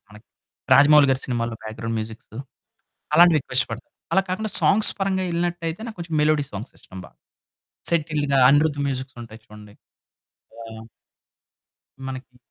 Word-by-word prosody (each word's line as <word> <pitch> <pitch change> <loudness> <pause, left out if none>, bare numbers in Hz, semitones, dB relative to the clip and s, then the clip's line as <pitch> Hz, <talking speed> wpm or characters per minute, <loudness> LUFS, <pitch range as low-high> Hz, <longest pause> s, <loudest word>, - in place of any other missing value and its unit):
మనకి 105 +1 -16 0.5
రాజమౌళి 145 0 +7
గారి 130 0 +1
సినిమాలో 120 -2 -2
బ్యాక్ 110 0 -8
గ్రౌండ్ 115 0 -3
మ్యూజిక్స్ 110 0 -8 0.8
అలాంటివి 170 -1 +6
ఎక్కువిష్టపడతాను. 125 -3 -3 0.3
అలా 195 - +4
కాకుండా 215 +4 -2
సాంగ్స్ 210 +2 +3
పరంగా 190 -1 0
ఎళ్ళినట్టయితే, 170 +1 -3
నాకు 220 - -9
కొంచెం 165 -2 -5
మెలోడీ 150 -1 +2
సాంగ్స్ 105 +5 -8
ఇష్టం 95 - -12
బాగా. - - -20 0.7
సెటిల్డ్‌గా 150 -4 0
అనిరుద్ 145 +1 +3
మ్యూజిక్స్ 130 -1 -5
ఉంటాయి 115 -1 -12
చూడండి. 105 -1 -14 0.9
ఆ! - - -9 1.4
మనకి 130 -1 -9
140 Hz, 130 wpm, -23 LUFS, 115-165 Hz, 1.4 s, రాజమౌళి